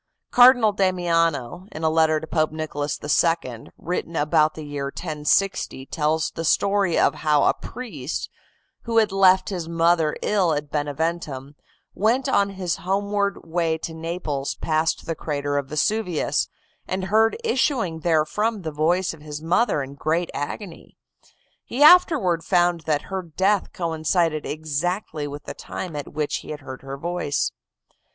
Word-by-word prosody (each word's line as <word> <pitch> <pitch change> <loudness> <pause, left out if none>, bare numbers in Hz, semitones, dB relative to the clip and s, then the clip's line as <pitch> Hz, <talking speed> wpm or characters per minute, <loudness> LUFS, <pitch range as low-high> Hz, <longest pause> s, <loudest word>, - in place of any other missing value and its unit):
Cardinal 245 -3 +7
Damiano, 175 -5 0
in 155 - -7
a 160 - +3
letter 160 -1 +3
to 160 - -7
Pope 155 -1 0
Nicholas 150 -2 -3
II., 145 -5 0
written 170 -1 -4
about 155 0 +2
the 155 - -7
year 145 -1 -4
1060 150 0 -1
tells 155 +2 0
the 165 - -5
story 200 +1 +2
of - - +4
how 150 -2 +3
a - - +4
priest, 180 - -6 0.6
who 230 -1 -1
had 215 -2 +4
left 190 -1 +4
his 175 -4 -4
mother 165 -2 +2
ill 190 -6 +2
at 145 -1 -4
Beneventum, 145 -2 -3 0.4
went 240 +6 +1
on 200 -7 +2
his 185 -3 -3
homeward 200 +1 -1
way 165 -1 0
to 160 +1 -6
Naples 160 -4 -3
past 160 +1 0
the 165 - -2
crater 145 -2 -3
of 140 - -6
Vesuvius, 180 +4 0 0.4
and 185 0 -2
heard 220 +4 +3
issuing 250 - 0
therefrom 175 +7 0
the 160 - -3
voice 170 +5 +1
of 160 - -14
his 150 -1 -7
mother 175 - +2
in 135 +1 -9
great 160 +4 -1
agony. 165 +5 -6 0.7
He 265 +5 0
afterward 295 - +6
found 175 -2 +2
that 150 -2 +1
her 190 -1 -4
death 190 +4 0
coincided 165 -1 0
exactly 155 +1 -3
with 145 0 -8
the - - -6
time 175 -4 -7
at 145 - -6
which 150 -1 -1
he - - -11
had 150 -1 -6
heard 130 -1 -9
her 135 0 -7
voice. 170 -2 -1
165 Hz, 150 wpm, -23 LUFS, 150-190 Hz, 0.7 s, Cardinal